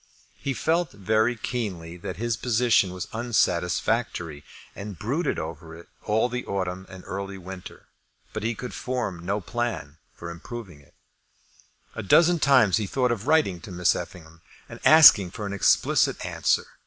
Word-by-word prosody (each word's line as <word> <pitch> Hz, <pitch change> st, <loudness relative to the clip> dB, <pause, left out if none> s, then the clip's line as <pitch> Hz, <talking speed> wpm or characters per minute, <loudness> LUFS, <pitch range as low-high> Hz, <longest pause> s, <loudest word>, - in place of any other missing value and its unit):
He 135 Hz, -2 st, -3 dB
felt 165 Hz, 0 st, 0 dB
very 110 Hz, +4 st, +1 dB
keenly 100 Hz, -8 st, -4 dB
that 90 Hz, 0 st, -7 dB
his 120 Hz, +2 st, -1 dB
position 115 Hz, -5 st, +2 dB
was 90 Hz, -1 st, -6 dB
unsatisfactory, 90 Hz, -6 st, 0 dB, 0.3 s
and 100 Hz, -2 st, -7 dB
brooded 140 Hz, -, -1 dB
over 80 Hz, +1 st, -7 dB
it 85 Hz, -, -14 dB
all 110 Hz, +3 st, +1 dB
the 125 Hz, 0 st, -4 dB
autumn 95 Hz, -1 st, -3 dB
and 95 Hz, -1 st, -11 dB
early 100 Hz, 0 st, -5 dB
winter; 95 Hz, 0 st, -10 dB, 0.5 s
but 110 Hz, -, -4 dB
he 115 Hz, +2 st, -1 dB
could 125 Hz, -, -7 dB
form 120 Hz, -9 st, -3 dB
no 100 Hz, +4 st, -1 dB
plan 110 Hz, -8 st, -4 dB, 0.2 s
for 85 Hz, 0 st, -7 dB
improving 90 Hz, -1 st, -9 dB
it. 70 Hz, -, -25 dB, 1.0 s
A -, -, -5 dB
dozen 170 Hz, -, +4 dB
times 130 Hz, -, +4 dB
he 105 Hz, -3 st, -2 dB
thought 125 Hz, +3 st, 0 dB
of 115 Hz, +1 st, -3 dB
writing 150 Hz, -, +2 dB
to 100 Hz, -, -10 dB
Miss 90 Hz, 0 st, +2 dB
Effingham, 80 Hz, -1 st, -9 dB, 0.3 s
and -, -, -10 dB
asking 135 Hz, -, +8 dB
for 105 Hz, +4 st, -7 dB
an 100 Hz, -, -4 dB
explicit 100 Hz, -, +2 dB
answer. -, -, +1 dB
100 Hz, 155 wpm, -25 LUFS, 90-120 Hz, 1.0 s, asking